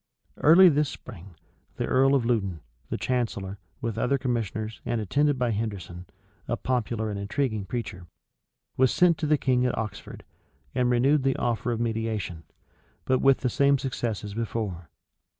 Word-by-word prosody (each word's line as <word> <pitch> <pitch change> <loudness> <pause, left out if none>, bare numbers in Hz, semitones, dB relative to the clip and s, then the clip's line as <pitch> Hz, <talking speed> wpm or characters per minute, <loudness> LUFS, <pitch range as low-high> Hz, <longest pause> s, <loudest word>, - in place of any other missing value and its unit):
[*] - - -41
Early 175 +5 +7
this 150 -3 +3
spring, 95 -6 -11 0.4
the - - -2
earl 135 +2 +4
of 125 -4 +1
Loudon, 100 -9 0 0.3
the - - -2
chancellor, 105 -6 -2 0.2
with 115 -1 -3
other 140 +4 +2
commissioners, 110 -4 -3
and 120 -1 -1
attended 145 +7 +1
by 125 -2 +1
Henderson, 100 -5 -4 0.4
a 120 - -1
popular 115 -3 -1
and 100 - -4
intriguing 110 0 -1
preacher, 100 -5 -5 0.7
was 130 0 +4
sent 175 -3 +3
to 155 - -1
the 150 0 +4
king 125 -2 +1
at 125 - 0
Oxford, 110 -3 -6 0.5
and 125 -1 +1
renewed 135 +4 +3
the 135 0 +1
offer 120 0 -1
of 115 - -2
mediation; 110 -7 -2 0.6
but 130 -1 +2
with 135 -1 +4
the 130 - +1
same 140 +2 +4
success 120 -5 -3
as 105 -1 -6
before. 105 -6 -4
115 Hz, 165 wpm, -26 LUFS, 105-130 Hz, 0.7 s, Early